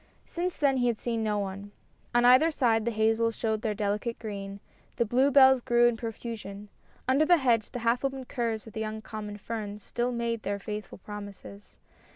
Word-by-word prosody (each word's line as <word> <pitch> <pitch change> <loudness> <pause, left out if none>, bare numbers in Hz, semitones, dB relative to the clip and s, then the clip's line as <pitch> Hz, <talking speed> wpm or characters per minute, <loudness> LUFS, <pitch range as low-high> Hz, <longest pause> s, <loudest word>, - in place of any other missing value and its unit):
Since 355 +1 -3
then 280 -3 +2
he 245 -1 +2
had 235 -2 +1
seen 230 -1 -2
no 210 -1 0
one. 200 0 -5 0.4
On 240 0 +5
either 255 +6 +7
side 230 -8 +1
the - - +2
hazels 225 0 +1
showed 220 -2 -1
their 215 -2 -1
delicate 210 +3 -2
green; 200 -2 -6 0.4
the 235 - +1
bluebells 265 +2 +5
grew 240 0 +3
in 240 - +1
profusion; 220 -3 -7 0.4
under 265 +4 +4
the 350 +2 +5
hedge 235 -7 +2
the - - -6
half 235 +3 +2
opened 270 -2 -3
curves 230 -3 -2
of 220 - -12
the - - -5
young 220 0 -4
common 210 -2 -6
ferns 210 -1 -6
still 240 +1 -2
made 235 -1 -2
their 200 0 -2
faithful 210 +1 -6
promises. 205 0 -10
225 Hz, 190 wpm, -28 LUFS, 210-245 Hz, 0.4 s, either